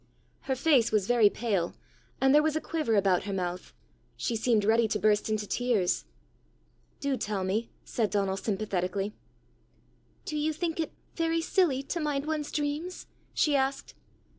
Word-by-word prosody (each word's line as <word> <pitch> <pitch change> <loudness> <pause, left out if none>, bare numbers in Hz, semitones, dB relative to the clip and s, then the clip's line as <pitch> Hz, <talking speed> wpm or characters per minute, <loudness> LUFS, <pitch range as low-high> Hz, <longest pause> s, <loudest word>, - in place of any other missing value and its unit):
Her 265 - +2
face 265 -4 +3
was 210 -3 +2
very 230 -2 +5
pale, 200 -7 -1 0.4
and 270 0 +4
there 300 - +7
was 310 0 +1
a - - +2
quiver 310 -9 -1
about 195 -2 +3
her 200 - -3
mouth: 180 -1 -3 0.5
she 235 - -1
seemed 220 -2 +2
ready 225 +1 +4
to 215 - 0
burst 210 0 +2
into 215 -1 -1
tears. 225 -5 0 0.9
"Do 280 -1 0
tell 210 -5 -2
me," 210 +5 -1 0.2
said 220 -3 0
Donal 195 -1 0
sympathetically. 195 -1 -2 1.1
"Do 305 - -3
you 310 +1 0
think 330 +1 -3
it 320 - -1 0.2
very 330 0 0
silly 325 -6 +2
to 340 +5 -3
mind 295 -2 -1
one's 305 -1 -2
dreams?" 300 +5 -3 0.3
she 295 -2 +3
asked. 270 0 -1
235 Hz, 160 wpm, -29 LUFS, 205-300 Hz, 1.1 s, there